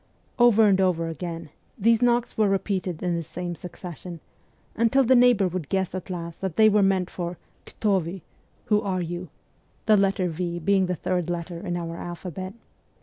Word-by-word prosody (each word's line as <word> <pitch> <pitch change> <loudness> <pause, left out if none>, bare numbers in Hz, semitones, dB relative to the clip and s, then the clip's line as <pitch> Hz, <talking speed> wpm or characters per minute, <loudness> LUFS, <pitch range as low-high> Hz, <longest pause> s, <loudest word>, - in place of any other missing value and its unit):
Over 230 -2 +6
and 190 -1 +4
over 170 -3 +1
again 165 -1 -6 0.3
these 230 +2 +3
knocks 240 -1 +2
were 215 -2 +3
repeated 190 -3 -1
in 175 -1 0
the 170 - -1
same 175 +2 -5
succession, 175 0 -9 0.6
until 230 +4 +3
the 260 +1 +4
neighbour 240 -5 +5
would 175 -4 -4
guess 190 -2 0
at 185 0 -6
last 170 -2 -6
that 190 -4 -3
they 215 +2 +6
were 210 0 +4
meant 190 -2 +2
for 175 -1 -4 0.2
' - - -38
Kto 200 -4 +1
vy? 170 +3 -6 0.2
' - - -38
(Who 210 -1 +3
are 185 -4 -1
you 175 +1 -5 0.3
?) - - -38
the 215 -1 +5
letter 195 -1 +2
v 170 +1 -3
being 190 +2 +2
the 180 - -1
third 180 0 -2
letter 170 0 -4
in 175 -2 -3
our 170 -1 -5
alphabet. 185 +3 -6
185 Hz, 195 wpm, -25 LUFS, 175-200 Hz, 0.6 s, Over